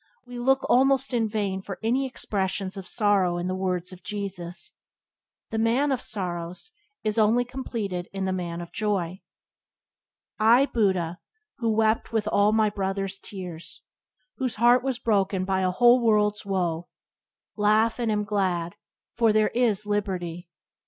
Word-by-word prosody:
We 245 0 -8
look 265 +2 +2
almost 270 +1 +3
in 225 -2 +1
vain 200 -3 -2
for 195 -1 -7
any 255 +4 +1
expressions 195 -5 -2
of 190 -2 -7
sorrow 195 -5 +2
in 175 - -3
the 185 - -1
words 185 -1 -2
of 180 - -12
Jesus. 190 -3 -5 0.8
The 220 - -1
"Man 245 +6 +2
of 260 - 0
Sorrows" 180 - -4 0.3
is 215 +1 +1
only 225 +3 +3
completed 220 -8 -4
in 195 -1 -3
the 190 - 0
Man 175 -2 -4
of 170 - -9
Joy. 190 -4 -2 1.2
"I, 235 +5 +6
Buddha, 190 -8 0 0.4
who 230 -2 0
wept 220 +1 +1
with 220 -2 0
all 205 0 +3
my 215 -1 +3
brother's 195 -1 -3
tears, 180 -5 -8 0.5
Whose 260 -3 -2
heart 240 +2 +5
was 265 -2 -1
broken 195 -5 +1
by 190 0 0
a 185 - +2
whole 240 +6 +5
world's 210 -2 +2
woe, 175 -3 -1 0.7
Laugh 215 +2 +2
and 230 -2 0
am 210 0 0
glad, 185 -4 -1 0.4
for 230 -2 +4
there 215 0 +3
is 220 -4 +1
Liberty!" 180 -5 -3
205 Hz, 150 wpm, -26 LUFS, 185-230 Hz, 1.2 s, I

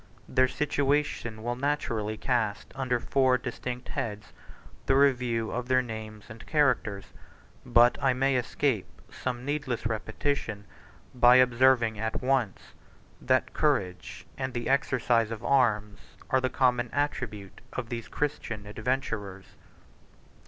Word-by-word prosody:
Their 130 0 +3
situation 140 -5 -1
will 120 +1 -1
naturally 120 -6 -2
cast 115 -4 -1
under 130 -2 -1
four 130 0 +2
distinct 125 0 -6
heads 105 -2 -5 0.5
the 135 - +4
review 125 -5 +2
of 125 +1 -3
their 130 0 +3
names 110 -2 -8
and 110 0 -11
characters; 125 -9 +1 0.6
but 120 +1 +4
I 135 - +3
may 135 +1 +1
escape 125 -3 0 0.2
some 125 -1 -4
needless 145 -5 -2
repetition, 110 -1 -2 0.5
by 125 0 +6
observing 125 -3 +4
at 110 +1 -2
once, 130 -6 -1 0.5
that - - +1
courage 90 -1 -1
and 130 -1 -3
the 120 -1 -2
exercise 125 -4 +2
of 115 0 -6
arms 105 -6 +2 0.3
are 130 - +3
the 130 - 0
common 125 -2 +1
attribute 120 -9 -3
of 120 -3 -5
these 115 -2 -5
Christian 115 -8 -3
adventurers. 105 -3 -3
120 Hz, 125 wpm, -28 LUFS, 110-130 Hz, 0.6 s, by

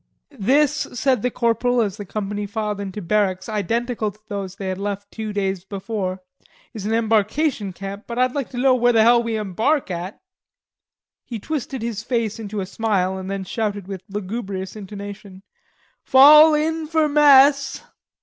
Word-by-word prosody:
"This," 280 +7 +2
said 250 -1 +1
the 250 - 0
corporal, 245 +1 +1
as 210 -3 0
the 205 - -7
company 205 +1 -4
filed 210 -1 -3
into 200 0 -6
barracks 190 0 0
identical 225 +2 -1
to 205 +1 -16
those 195 -2 -5
they 195 -2 -5
had 185 0 -4
left 200 0 -4
two 220 -1 -5
days 195 -3 -2
before, 190 -2 -4 0.5
"is 210 -3 -5
an - - -1
embarkation 225 +1 +1
camp, 195 +3 -8
but 235 - -6
I'd 255 0 +2
like 280 -4 -3
to 250 - -9
know 260 +1 +4
where 245 -1 +3
the 225 -1 +5
hell 235 +1 +5
we 230 -1 -2
embark 215 - 0
at." 180 +3 -5 1.0
He 235 - -6
twisted 275 +1 -4
his 230 -3 -3
face 230 -2 -2
into 210 -2 -4
a - - -3
smile, 190 -3 -1
and 190 0 -6
then 195 -1 -3
shouted 205 -1 -3
with 195 -2 -6
lugubrious 195 -1 -5
intonation: 200 -1 -9 0.6
"Fall 300 +4 +8
in 320 +1 -1
for 315 -1 +2
mess." 280 -1 +5
215 Hz, 170 wpm, -21 LUFS, 195-245 Hz, 1.0 s, Fall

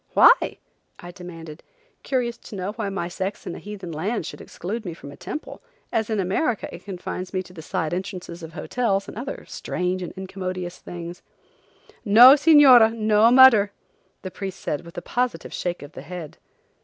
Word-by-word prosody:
"Why?" - - +6 0.4
I 175 - -10
demanded, 165 -3 -10 0.4
curious 245 -3 -1
to - - -11
know 190 +1 -3
why 215 -2 -4
my 195 -3 -3
sex 190 +3 -5
in - - -5
heathen 200 -4 -8
lands 180 +4 -2
should - - -8
exclude 215 +6 -6
me 175 -5 -6
from 140 - -11
a - - -11
temple, 190 +12 -7 0.3
as 220 -1 0
in 215 -2 0
America 200 - 0
it - - -11
confines 185 -1 -6
me 185 - 0
to 180 - -16
the 165 - -9
side 155 0 -3
entrances 180 -2 -5
of 160 -1 -9
hotels 195 +4 -1
and - - -9
other 255 +6 -6
strange 180 +1 -3
and 180 - -5
incommodious 185 -1 -5
things. 175 0 -8 0.8
"No, 235 +5 +9
Señora, 280 -7 +7
no 215 0 +4
mudder," 235 -5 +7 0.5
the 185 - -6
priest 195 -1 -6
said 150 - -3
with 170 - -13
a 175 - -5
positive 245 -9 -2
shake 175 -3 -3
of 145 - -11
the - - -9
head. 175 -4 -9
190 Hz, 180 wpm, -23 LUFS, 175-220 Hz, 0.8 s, No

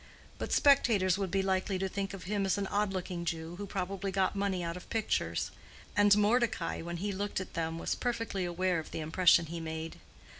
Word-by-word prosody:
But - - -4
spectators 205 -10 +4
would 195 -2 -1
be 195 +2 +1
likely 190 0 0
to 190 +1 -1
think 195 +1 -3
of 190 - -9
him 200 +1 -1
as 195 +1 +1
an 200 - -1
odd 205 +1 0
looking 180 -2 -3
Jew 165 0 -4
who 205 +1 -5
probably 195 0 -3
got 190 +1 +1
money 195 -3 0
out 170 0 -3
of 180 - -10
pictures; 225 -2 -1 0.4
and 205 -1 +6
Mordecai, 215 -3 +1
when 170 +1 -5
he 200 +4 -2
looked 200 +1 -2
at 185 - -7
them, 165 0 -2
was - - -1
perfectly 230 -6 -2
aware 180 0 0
of 160 - -7
the - - -5
impression 165 +1 +4
he 165 +1 -5
made. 160 0 -5
190 Hz, 210 wpm, -31 LUFS, 170-200 Hz, 0.4 s, and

